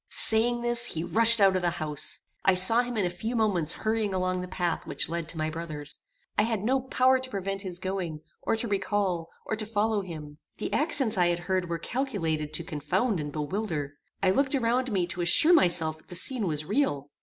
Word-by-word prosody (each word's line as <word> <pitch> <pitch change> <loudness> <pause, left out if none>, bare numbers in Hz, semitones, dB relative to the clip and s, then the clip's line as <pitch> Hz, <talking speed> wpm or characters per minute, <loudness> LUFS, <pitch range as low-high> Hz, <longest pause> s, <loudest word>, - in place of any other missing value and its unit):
Saying 235 +2 +5
this, 240 0 +2
he 160 -6 -4
rushed 230 +5 +6
out 195 -2 +4
of 185 - 0
the 175 - +1
house. 155 -3 -4 0.2
I 190 - +4
saw 205 +6 +7
him 245 -1 -5
in 200 - +1
a - - 0
few 220 +7 -5
moments 190 -9 +1
hurrying 215 -3 -2
along 185 0 -1
the 180 - -6
path 175 -2 -3
which - - -1
led 165 -1 -4
to 165 - -3
my 155 0 -2
brother's. 155 -3 -5 0.4
I - - +6
had 220 -3 -1
no 260 +4 +1
power 260 0 +2
to 260 0 -4
prevent 195 -2 -4
his 185 -3 -2
going, 180 -4 -4 0.2
or - - 0
to 225 +1 -2
recall, 195 -4 -1 0.2
or - - -2
to 215 - -4
follow 215 0 0
him. 155 -5 -9 0.2
The - - -4
accents 275 - +1
I 175 - +4
had 175 0 0
heard 180 0 -2
were 170 - -2
calculated 165 - -3
to 170 - -2
confound 185 - -1
and 150 -1 -5
bewilder. 150 -2 -4 0.3
I 185 - +4
looked 270 +6 +2
around 250 0 0
me 185 -4 +1
to 175 0 -5
assure 240 - +5
myself 170 - +2
that 155 - -24
the 180 - -8
scene 225 +3 0
was 155 -2 -3
real. 150 - -1
190 Hz, 215 wpm, -27 LUFS, 170-225 Hz, 0.4 s, saw